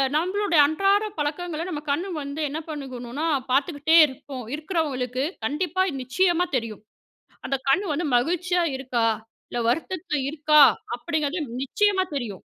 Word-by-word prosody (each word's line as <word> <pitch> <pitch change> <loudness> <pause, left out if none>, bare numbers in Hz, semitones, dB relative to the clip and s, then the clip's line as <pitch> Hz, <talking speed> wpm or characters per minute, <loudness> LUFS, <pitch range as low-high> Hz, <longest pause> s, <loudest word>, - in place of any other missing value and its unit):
நம்மளோட 370 +4 0
அன்றாட 390 +7 +2
பழக்கங்கள 315 +2 -3
நம்ம 300 -4 -4
கண் 335 +6 0 0.2
வந்து 280 +2 -5
என்ன 300 +3 -4
பண்ணிக்கணும்னா, 270 -1 -5 0.3
பார்த்துக்கிட்டே 295 +3 +3
இருப்போம். 265 -2 -8
இருக்கவங்களுக்கு, 285 -6 -2 0.2
கண்டிப்பா, 360 +7 0 0.2
நிச்சியமா 350 +7 +1
தெரியும்! 230 -4 -3 0.6
அந்த 275 - 0
கண் 380 +9 +3
வந்து 320 +2 -1
மகிழ்ச்சியா 355 +6 +1
இருக்கா, 255 -3 -1 0.4
இல்ல 240 - -3
வருத்தத்தில 330 +3 -2
இருக்கா 300 0 +5 0.4
அப்டிங்கிறது 315 +2 -2 0.2
நிச்சியமா 395 +7 +2
தெரியும்! 225 -9 -4
300 Hz, 120 wpm, -24 LUFS, 265-350 Hz, 0.6 s, இருக்கா